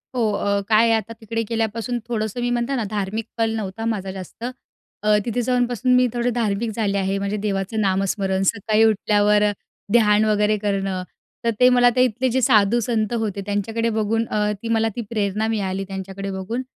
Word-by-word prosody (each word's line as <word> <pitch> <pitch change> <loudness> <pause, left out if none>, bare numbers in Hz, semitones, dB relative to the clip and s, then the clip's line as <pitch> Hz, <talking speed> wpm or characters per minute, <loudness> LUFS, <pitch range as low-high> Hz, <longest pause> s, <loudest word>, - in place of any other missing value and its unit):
हो, 225 -4 +1
अ, 200 0 0
काय 220 +1 +5
आहे 230 - +3
आता 220 +1 -6
तिकडे 225 +1 -2
गेल्यापासून 230 +2 -2
थोडंसं 220 0 -2
मी 245 - 0
म्हणते 245 +3 0
ना, 240 - -1
धार्मिक 210 +1 -3
क्षण 225 0 -2
नव्हता 220 +1 -4
माझा 195 -4 -2
जास्त. 190 +4 -9 0.6
अ, 210 0 +4
तिथे 240 +1 -1
जाऊनपासून 245 0 +1
मी 250 0 +4
थोडे 240 0 0
धार्मिक 225 -2 -1
झाले 200 -3 0
आहे. 195 0 0
म्हणजे 200 +1 -2
देवाचं 200 +2 -1
नामस्मरण 195 0 0
सकाळी 215 +2 +2
उठल्यावर, 210 -1 +3 0.5
ध्यान 215 -2 +5
वगैरे 210 0 +2
करणं 195 -2 -2 0.4
तर, 230 - +3
ते 250 - +7
मला 245 -1 +5
ते 250 +1 +3
तिथले 250 +3 -1
जे 260 +2 +1
साधूसंत 225 -1 +2
होते, 205 -3 -2
त्यांच्याकडे 220 +3 -1
बघून 220 +1 0
अ, 210 0 0
ती 230 - -5
मला 225 0 +2
ती 240 - -2
प्रेरणा 215 -1 -1
मिळाली 195 -3 -1
त्यांच्याकडे 195 0 -6
बघून. 195 +6 -3
215 Hz, 180 wpm, -22 LUFS, 200-230 Hz, 0.6 s, ते